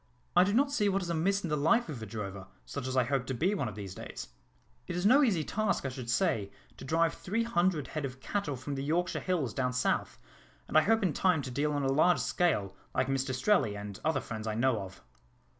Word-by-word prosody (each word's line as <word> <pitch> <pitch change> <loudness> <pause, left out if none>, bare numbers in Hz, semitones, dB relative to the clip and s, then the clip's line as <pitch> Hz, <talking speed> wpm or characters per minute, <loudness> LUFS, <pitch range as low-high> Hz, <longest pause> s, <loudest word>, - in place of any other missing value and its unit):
I 180 - +7
do 195 - +1
not 275 +6 +3
see 210 -8 +2
what 195 0 0
is 170 - -3
amiss 195 +5 +1
in 170 - -2
the - - +3
life 165 +12 +3
of 135 -7 -6
a 110 - -6
drover, 100 -3 -6 0.2
such 135 -2 -5
as 130 0 -2
I 130 - +5
hope 130 0 -1
to 130 - -2
be 180 - +1
one 160 -11 -1
of 105 - -6
these 100 -3 -6
days. - - -8 0.6
It 180 - -4
is 180 +2 -1
no 260 +7 +7
easy 200 - +2
task, 215 -2 -1
I - - 0
should 130 -2 -7
say, 110 -3 +1 0.3
to - - -10
drive 165 +4 +2
three 225 +5 -2
hundred 180 - +1
head 155 - -4
of 130 -1 -5
cattle 160 -1 -2
from 130 +3 -5
the 135 0 -3
Yorkshire 170 +5 0
hills 160 - -1
down 125 -1 -1
South, 125 - 0 0.5
and - - -7
I 155 - +8
hope 220 +5 +2
in 180 -5 +1
time 180 -6 +2
to 130 - -5
deal 145 +4 0
on 145 -1 -1
a 135 - +1
large 170 +5 +4
scale, 100 - 0 0.2
like - - +2
Mr 135 0 0
Strelley, 130 - +2
and 100 -1 -7
other 155 -4 +1
friends 110 -1 -6
I 110 - -1
know 120 -1 +2
of." 95 -1 -10
145 Hz, 245 wpm, -31 LUFS, 125-180 Hz, 0.6 s, I